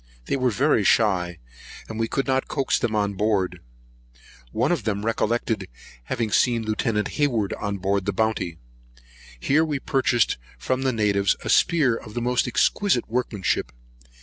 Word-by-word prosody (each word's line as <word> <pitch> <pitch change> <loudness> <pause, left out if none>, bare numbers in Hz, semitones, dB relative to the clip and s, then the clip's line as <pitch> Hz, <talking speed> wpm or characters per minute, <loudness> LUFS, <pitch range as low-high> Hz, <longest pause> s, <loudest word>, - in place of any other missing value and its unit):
They - - -1
were 130 -2 +1
very 125 -1 +2
shy, 90 -5 +2 0.5
and 110 0 -6
we 115 - +1
could 135 +4 -1
not 130 -1 0
coax 135 -2 0
them 115 -3 -1
on 100 -1 0
board. 95 -3 0 0.9
One - - +1
of - - +1
them 105 -1 -2
recollected 115 -3 -1 0.4
having 115 - -2
seen 120 0 +2
Lieut. 110 0 0
Hayward 120 -9 0
on 100 -1 -3
board 100 +1 -1
the - - +2
Bounty. 100 -5 -1 0.8
Here 145 - +3
we 150 -3 -1
purchased 130 - +1 0.2
from 130 0 -1
the 135 -1 +1
natives 100 -4 +2
a - - -3
spear 150 -9 +3
of 115 0 -6
most 125 +1 +1
exquisite 155 - +1
workmanship. 110 - -1
110 Hz, 150 wpm, -24 LUFS, 100-125 Hz, 0.9 s, Here